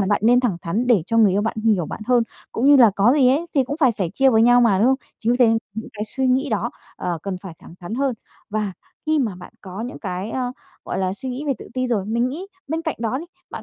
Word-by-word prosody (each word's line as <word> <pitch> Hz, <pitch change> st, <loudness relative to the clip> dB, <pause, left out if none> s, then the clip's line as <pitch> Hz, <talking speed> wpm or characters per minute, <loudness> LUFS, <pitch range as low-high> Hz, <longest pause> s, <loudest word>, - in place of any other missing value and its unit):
là 195 Hz, -, +1 dB
bạn 205 Hz, -, +2 dB
nên 245 Hz, +2 st, +5 dB
thẳng 225 Hz, -9 st, 0 dB
thắn 210 Hz, +9 st, -1 dB
để 235 Hz, -8 st, +4 dB
cho 230 Hz, -, +1 dB
người 215 Hz, -3 st, +6 dB
yêu 205 Hz, +2 st, +1 dB
bạn 225 Hz, +1 st, -2 dB
hiểu 215 Hz, -6 st, +1 dB
bạn -, -, -7 dB
hơn, 245 Hz, -2 st, +4 dB, 0.3 s
cũng 240 Hz, -, 0 dB
như 285 Hz, 0 st, +8 dB
là 235 Hz, -5 st, +7 dB
có 215 Hz, +6 st, +5 dB
gì 270 Hz, -4 st, +4 dB
ấy 295 Hz, +6 st, +1 dB
thì 270 Hz, -2 st, +3 dB
cũng 285 Hz, +4 st, -4 dB
phải 260 Hz, -5 st, +5 dB
sẻ 190 Hz, -5 st, -2 dB
chia 270 Hz, 0 st, +4 dB
với 225 Hz, -2 st, +4 dB
nhau 245 Hz, +1 st, +6 dB
mà, 215 Hz, -6 st, +4 dB
đúng 220 Hz, -, +4 dB
không? 265 Hz, +1 st, +4 dB, 0.2 s
Chính 230 Hz, +2 st, +1 dB
vì -, -, +1 dB
thế 245 Hz, -, +6 dB, 0.3 s
những 220 Hz, +1 st, -6 dB
cái 210 Hz, 0 st, -4 dB
suy 265 Hz, -1 st, +1 dB
nghĩ 265 Hz, +3 st, +2 dB
đó, 220 Hz, +2 st, -1 dB, 0.3 s
ờ, 175 Hz, -2 st, -3 dB
cần 195 Hz, -1 st, -3 dB
phải 180 Hz, -4 st, -8 dB
thẳng -, -, -14 dB
thắng 180 Hz, +5 st, -6 dB
hơn 270 Hz, 0 st, 0 dB, 0.4 s
và 210 Hz, -2 st, -2 dB, 0.3 s
khi 310 Hz, -1 st, +2 dB
mà 225 Hz, -8 st, 0 dB
bạn 180 Hz, -, -12 dB
có 190 Hz, +1 st, -8 dB
những 245 Hz, +3 st, -6 dB
cái, 190 Hz, +1 st, -4 dB
ơ, 250 Hz, -1 st, -2 dB, 0.3 s
gọi -, -, -3 dB
là, 185 Hz, -1 st, 0 dB
suy 260 Hz, +6 st, -7 dB
nghĩ 255 Hz, +4 st, -5 dB
về 280 Hz, -, +2 dB
tự -, -, -11 dB
ti 255 Hz, 0 st, 0 dB
rồi, 220 Hz, -6 st, 0 dB
mình 235 Hz, +3 st, 0 dB
nghĩ 325 Hz, +9 st, -6 dB, 0.2 s
bên 325 Hz, +2 st, -2 dB
cạnh 320 Hz, -3 st, -3 dB
đó 230 Hz, +3 st, -1 dB
đi, 330 Hz, -, -7 dB, 0.3 s
bạn -, -, -7 dB
235 Hz, 290 wpm, -21 LUFS, 205-260 Hz, 0.4 s, như